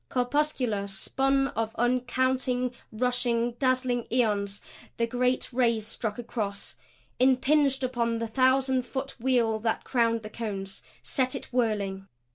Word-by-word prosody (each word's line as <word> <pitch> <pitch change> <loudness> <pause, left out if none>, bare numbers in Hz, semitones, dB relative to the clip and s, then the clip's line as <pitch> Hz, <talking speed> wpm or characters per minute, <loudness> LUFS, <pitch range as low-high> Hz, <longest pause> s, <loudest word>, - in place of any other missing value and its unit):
Corpuscular, 250 -5 0
spun 270 +7 +1
of 225 -4 -3
uncounted 250 +1 +1 0.2
rushing, 240 0 0
dazzling 255 -2 +1
ions 205 -5 +1 0.4
the 230 - +2
great 250 +2 0
rays 235 -3 +2
struck 220 -1 -3
across, 215 -4 -4 0.4
impinged 270 +2 +3
upon 235 -2 0
the 230 0 -2
thousand 260 +2 +3
foot 265 +2 -4
wheel 235 -3 +2
that 225 0 -1
crowned 230 -2 +1
the 215 - -6
cones; 195 -4 -5 0.2
set 260 -1 0
it 265 - -8
whirling. 200 -5 0
245 Hz, 120 wpm, -28 LUFS, 225-255 Hz, 0.4 s, impinged